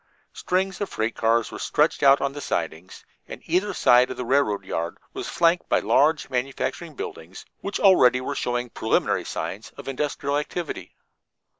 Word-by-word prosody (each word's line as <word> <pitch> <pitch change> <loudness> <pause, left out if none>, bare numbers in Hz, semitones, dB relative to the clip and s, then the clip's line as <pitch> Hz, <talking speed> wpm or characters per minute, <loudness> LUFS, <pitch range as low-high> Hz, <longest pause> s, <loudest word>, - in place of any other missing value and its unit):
Strings 190 +1 -1
of 205 - -2
freight 110 +1 -2
cars 115 0 +1
were - - -7
stretched 150 +2 +1
out 140 0 +6
on 140 0 -1
the 145 - -7
sidings, 85 - -4 0.2
and - - -8
either 185 +5 +1
side 125 -8 +4
of - - -6
the 125 - -4
railroad 110 -7 +1
yard 85 -2 -3 0.2
was - - -5
flanked 170 +1 +2
by - - +4
large 150 +3 +2
manufacturing 135 +5 -3
buildings, 85 -4 -8
which 200 - -4
already 130 -11 +5
were 130 - -3
showing 120 0 -2
preliminary 110 - 0
signs 100 +4 -5
of - - -10
industrial 140 +1 -1
activity. 165 +2 -6
135 Hz, 165 wpm, -24 LUFS, 115-160 Hz, 0.2 s, out